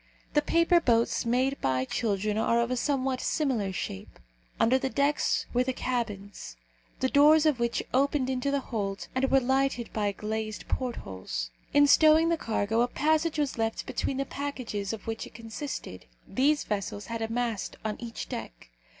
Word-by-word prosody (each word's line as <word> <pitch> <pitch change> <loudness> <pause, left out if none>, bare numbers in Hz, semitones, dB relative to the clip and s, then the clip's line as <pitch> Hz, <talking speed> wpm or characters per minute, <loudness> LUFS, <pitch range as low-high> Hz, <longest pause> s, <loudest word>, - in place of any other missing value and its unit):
The 295 - +4
paper 335 +3 +4
boats 235 -5 +1
made 260 +3 +1
by 130 -1 +1
children 210 - -1
are 230 +2 +2
of 235 +1 0
a - - +1
somewhat 260 0 0
similar 250 - 0
shape. 95 - -6 0.4
Under 255 +3 +4
the 265 - -1
decks 280 +2 +1
were 250 +1 +3
the 260 +1 -1
cabins, 205 - -4 0.4
the 260 - +3
doors 300 +3 +6
of 300 -5 +3
which 235 0 0
opened 275 0 +2
into 260 +1 -1
the 280 0 0
hold 200 -6 -4
and 265 +1 +1
were 270 - +5
lighted 265 -1 0
by 205 -2 0
glazed 215 +1 -4
portholes. 95 - -4 0.2
In 290 0 +6
stowing 315 +3 +6
the 335 - +3
cargo 225 -3 0
a 240 - +3
passage 315 +4 +1
was 285 -5 -1
left 225 0 -1
between 270 - -2
the 275 - -1
packages 255 -9 -4
of 225 -2 -7
which 225 0 -4
it - - -18
consisted. 230 +6 -6 0.2
These 290 +3 +2
vessels 205 0 -3
had 230 -1 -5
a 225 - -2
mast 230 -4 -2
on 215 -1 -2
each 235 -1 -6
deck. - - -8
245 Hz, 175 wpm, -28 LUFS, 215-280 Hz, 0.4 s, doors